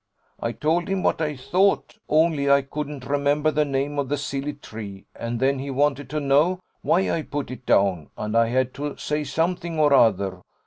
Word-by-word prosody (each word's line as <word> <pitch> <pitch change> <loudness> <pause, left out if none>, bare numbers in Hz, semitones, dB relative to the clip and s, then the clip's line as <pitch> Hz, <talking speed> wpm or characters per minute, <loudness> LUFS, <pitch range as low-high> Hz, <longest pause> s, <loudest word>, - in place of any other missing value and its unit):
I 115 - -2
told 160 +7 0
him 195 -1 -1
what - - +1
I 150 -1 -1
thought; 190 +10 +1
only 155 -2 +3
I 140 0 +5
couldn't 145 -1 -6
remember 145 +2 +1
the 150 0 +2
name 140 +1 -1
of 135 -2 -1
the 145 - 0
silly 140 0 -3
tree: 110 -8 -9
and 115 0 -4
then 135 +1 +2
he 140 +1 -5
wanted 140 0 0
to 150 +1 -2
know 150 +6 +3 0.2
why 190 +3 +2
I 165 - 0
put 145 -3 -5
it 130 -1 -9
down, 95 -6 +2
and 105 +1 -3
I 115 0 +4
had 130 +1 0
to 145 +1 -5
say 150 0 -2
something 165 +3 -1
or 145 -2 +5
other. 100 -7 +3
140 Hz, 195 wpm, -24 LUFS, 130-150 Hz, 0.2 s, I